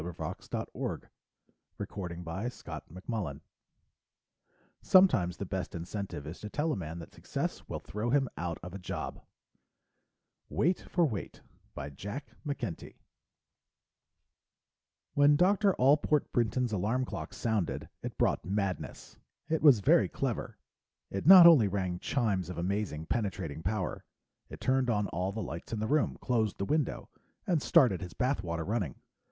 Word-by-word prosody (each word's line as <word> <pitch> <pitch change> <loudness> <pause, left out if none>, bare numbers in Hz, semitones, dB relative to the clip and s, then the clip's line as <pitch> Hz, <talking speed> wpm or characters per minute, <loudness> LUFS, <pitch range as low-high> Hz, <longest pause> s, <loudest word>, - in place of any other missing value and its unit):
pgdp.net 85 0 -4
Wait - - -20
for - - -2
Weight - - -5 0.7
By 90 0 -5
JACK - - -8
McKENTY 90 - -4 1.4
Sometimes 105 - +5
the - - -4
best - - -4
incentive 85 -3 -5
is 75 +3 -7
to 105 - -7
tell 155 +7 0
a - - 0
man 85 -3 -5
that 85 - -10
success - - -3
will - - -4
throw 105 +3 -3
him 135 +1 +3
out 85 +1 -3
of 90 +1 -7
a 100 - -6
job! 90 - -5 1.3
Illustrated 165 - 0 0.3
by 70 +2 -5
SIBLEY 125 - -6 2.2
When 145 +1 +5
Dr. 195 +4 +4
Allport 145 +2 +3
Brinton's 120 0 +1
alarm 110 +7 0
clock - - -6
sounded, 110 -7 -1
it - - -6
brought - - +1
madness. 100 0 -3 0.3
It 160 0 +1
was 140 -9 +7
very - - +4
clever; - - -3 0.5
it 100 +9 -3
not 185 -2 +11
only 155 -11 +8
rang 90 -2 -2
chimes 100 - 0
of 90 - -6
amazing 90 -3 -2
penetrating 95 -6 -2
power, 95 +2 -2 0.5
it - - -9
turned 130 -1 +1
on 105 -3 +1
all 90 +2 -2
the 110 +1 -4
lights 85 - -7
in 110 - -2
the 110 - -1
room, 145 +5 +1
closed 110 -4 0
the 100 - -2
window, 150 +3 -1 0.4
and 170 -6 +1
started 105 - +4
his 90 -1 -7
bath 130 -2 0
water 85 -3 -3
running. 100 - -1
105 Hz, 140 wpm, -31 LUFS, 90-135 Hz, 2.2 s, not